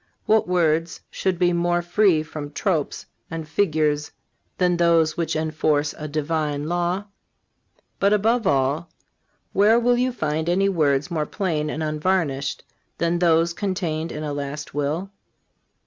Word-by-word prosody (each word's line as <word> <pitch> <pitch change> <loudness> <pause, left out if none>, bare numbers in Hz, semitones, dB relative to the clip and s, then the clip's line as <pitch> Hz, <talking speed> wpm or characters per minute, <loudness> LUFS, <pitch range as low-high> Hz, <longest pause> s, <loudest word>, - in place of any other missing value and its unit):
What 220 -2 +3
words 165 -2 +1
should 190 -2 -1
be 175 0 +2
more 175 0 +1
free 175 -2 +3
from 150 -1 -7
tropes 165 -7 -1 0.2
and 165 -1 -5
figures 155 -3 0 0.5
than 180 -1 +2
those 165 -2 +3
which 170 -1 -1
enforce 155 -1 0
a 155 - -6
Divine 150 -1 -2
law? 175 +3 0 1.0
But, 200 +1 +3
above 220 +1 +2
all, 140 +5 +1 0.6
where 215 +4 +5
will 245 +1 +3
you 255 +1 +1
find 155 -6 -2
any 195 +3 +2
words 150 -3 +1
more 155 -3 -1
plain 155 -6 -1
and 155 +1 -3
unvarnished 155 -3 -1 0.3
than 170 +1 0
those 170 -1 +3
contained 170 -5 -2
in 150 - -5
a 150 -1 -3
last 145 +1 -5
will? 150 +7 -2
165 Hz, 140 wpm, -23 LUFS, 150-180 Hz, 1.0 s, where